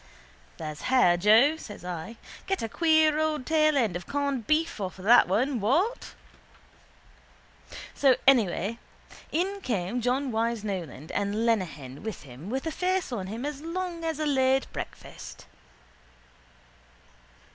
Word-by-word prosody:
—There's 155 -2 -6
hair, 250 -10 +5
Joe, 220 - +5
says 205 - -10
I. 180 +6 -6 0.3
Get 385 -7 -1
a - - -1
queer 315 +2 +3
old 310 -4 -1
tailend 305 - +2
of 175 0 -6
corned 280 -5 -2
beef 310 -7 +1
off 190 -1 -4
of 185 - -10
that 240 +3 +7
one, 245 +7 +1
what? 330 - 0 1.8
So 270 -3 +4
anyhow 225 -4 +3 0.5
in 390 +5 -1
came 225 - -2
John 255 +3 0
Wyse 225 0 -1
Nolan 170 -7 -5
and 205 +3 -1
Lenehan 155 - -2
with 220 -4 -6
him 140 +7 -10
with 265 +5 -3
a 320 - -1
face 370 -1 -1
on 195 -6 -3
him 225 +7 -5
as 295 -1 -5
long 340 +1 -4
as 320 -2 -2
a 310 - -1
late 265 -2 +2
breakfast. - - -8
245 Hz, 135 wpm, -27 LUFS, 200-305 Hz, 1.8 s, that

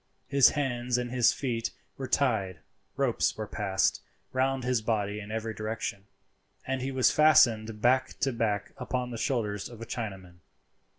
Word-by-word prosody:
His 140 -1 +6
hands 125 -3 0
and 120 -1 -3
his 125 -1 +4
feet 120 -4 -2 0.3
were 135 - -5
tied, 105 -11 +1 0.4
ropes - - +1
were 110 - -3
passed 100 -2 0 0.3
round 130 0 +1
his 125 -2 +1
body 105 -2 -1
in 105 0 -8
every 110 0 -3
direction, 110 -2 -4 0.6
and 130 0 -2
he 135 +1 -2
was 130 -3 +3
fastened 115 -8 +4
back 130 +2 +2
to 135 - +1
back 105 -3 -1
upon 125 -1 -3
the 115 - -5
shoulders 105 -6 -1
of 120 -2 -11
a 115 - -6
Chinaman. 95 -7 -6
115 Hz, 160 wpm, -29 LUFS, 105-130 Hz, 0.6 s, His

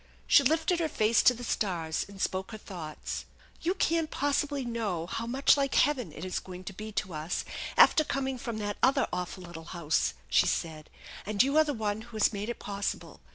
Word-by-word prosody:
She - - +7
lifted 320 +5 +2
her 325 -2 0
face 220 -3 +3
to 250 - +5
the 245 - -8
stars, 170 -8 -1
and 200 -1 -12
spoke 190 +1 -2
her - - -5
thoughts. 170 -7 -6 0.2
" - - -27
You 355 +3 0
can't 330 -3 +1
possibly 285 -1 0
know 215 -8 -2
how 225 +6 -4
much 265 +4 +4
like 275 -1 0
heaven 255 - +2
it 155 +4 -7
is 185 - -2
going 185 0 -9
to 195 - -7
be 215 +3 -7
to 195 -3 -2
us 155 +3 -3 0.3
after 310 - +7
coming 265 -3 -2
from 235 -2 -4
that 205 -1 -3
other 265 - +4
awful 180 +1 -4
little 170 -2 -9
house/ 160 -2 +1
4 - - -31
she - - +5
said; 155 -2 -2
te 195 - -13
and 210 +2 +4
you 275 +2 0
are 315 - +7
the 295 -2 -2
one 215 -1 -2
who 230 -1 -9
has 215 - +3
made 205 +2 -3
it 240 - -3
possible. 200 0 -4
215 Hz, 220 wpm, -29 LUFS, 185-275 Hz, 0.3 s, She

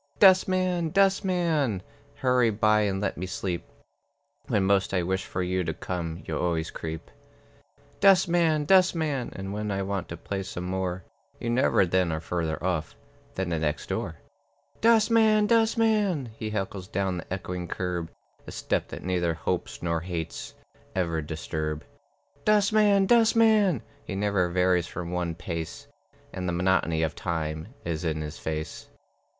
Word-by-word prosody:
Dustman, 185 -3 +4
dustman, 175 - +2 0.3
Hurry 125 -2 +3
by 105 0 +3
and 100 -2 0
let 100 - -2
me 90 +2 -4
sleep. 90 -2 -3 0.8
When 100 - +2
most 100 0 +2
I 90 - +2
wish 95 +2 -1
for 90 - -2
you 90 +1 0
to 80 -2 -3
come, 85 -1 -4
You 80 -2 -3
always 80 -2 -1
creep. 80 -1 -6 0.9
Dustman, 170 -5 +4
dustman, 160 -7 +3
And 95 +1 -5
when 105 0 -3
I 100 -1 -1
want 100 -1 -3
to - - -6
play 100 -1 -4
some 90 -2 -6
more, 90 0 -2 0.4
You 115 - -2
never 120 -5 +3
then 90 -1 +1
are 80 - -1
further 80 -1 -2
off 90 -4 -1 0.4
Than 95 -2 -2
the 85 -2 0
next 75 -1 -2
door. - - -2 0.7
"Dustman, 220 -1 +5
dustman!" 215 - +2
He 110 -1 -4
heckles 95 -3 -4
down 95 -1 -1
the 85 - -11
echoing 90 -1 -4
curb, 90 -2 -3 0.4
A - - -6
step - - -1
that - - -8
neither 85 -2 0
hopes 80 - -3
nor 85 -1 0
hates 85 -2 -5 0.4
Ever 85 -3 0
disturb. 75 0 -4 0.6
"Dustman, 210 -1 +4
dustman!" 220 - +4 0.2
He 95 - -5
never 100 -3 +1
varies 90 -1 +2
from 85 -1 -6
one 90 -2 -2
pace, 85 -1 -5 0.5
And 90 -1 -3
the - - -1
monotony 85 -2 +1
of 80 -2 0
time 80 -1 -3 0.2
Is 85 -1 -2
in 80 -2 -1
his 75 +1 -6
face. 80 0 -5
95 Hz, 150 wpm, -27 LUFS, -, 0.9 s, Dustman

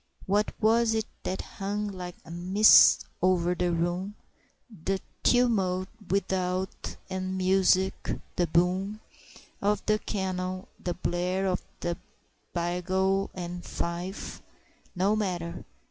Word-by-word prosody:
What 205 +2 +2
was 225 +1 +3
it 220 -1 0 0.2
that 185 - -3
hung 205 +1 -3
like 180 -3 -6
a 165 - -10
mist 185 +5 +6 0.2
o'er 180 -1 +3
the 180 0 0
room? 175 +4 -1 0.6
The 195 0 -2 0.2
tumult 195 -7 +2 0.2
without 185 -1 -1
and 185 0 -3
the 185 - -3
music 190 0 +3 0.3
the 175 - +2
boom 185 +5 +1 0.6
Of 210 +1 +1
the 215 0 +2
canon 185 -2 -3 0.2
the 175 - -1
blare 180 +2 -1
of 185 -1 0 0.2
the 170 0 -1 0.5
bugle 185 +3 0
and 175 -1 -5
fife? 175 +3 -4 0.5
No 195 +4 +2
matter! 175 -5 -3
185 Hz, 115 wpm, -28 LUFS, 180-195 Hz, 0.6 s, mist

